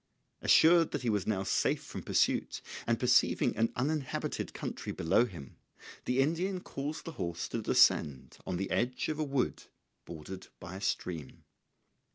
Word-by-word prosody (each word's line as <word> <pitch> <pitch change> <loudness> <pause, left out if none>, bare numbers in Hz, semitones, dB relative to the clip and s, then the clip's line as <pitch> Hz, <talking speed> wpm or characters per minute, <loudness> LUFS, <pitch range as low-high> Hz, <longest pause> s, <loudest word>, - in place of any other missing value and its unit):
Assured 165 0 +6
that 145 - -2
he 120 - +1
was 105 -3 -1
now 95 -3 0
safe - - +1
from - - -7
pursuit, - - 0 0.2
and - - +1
perceiving - - +3
an 115 +1 +1
uninhabited 140 +1 -2
country - - -5
below 80 +9 +2
him, 85 - -10 0.5
the 125 +2 +2
Indian 175 +6 0
caused 145 -2 -5
the 165 - -5
horse 85 -2 -3
to - - -2
descend 65 -4 +3
on 90 - -3
the 95 +1 -3
edge 125 +4 0
of 155 0 -3
a - - +1
wood 135 -3 -1 0.4
bordered 85 +3 -8
by 90 +2 -8
a 95 - -7
stream. 85 -7 -3
120 Hz, 160 wpm, -31 LUFS, 90-150 Hz, 0.5 s, Assured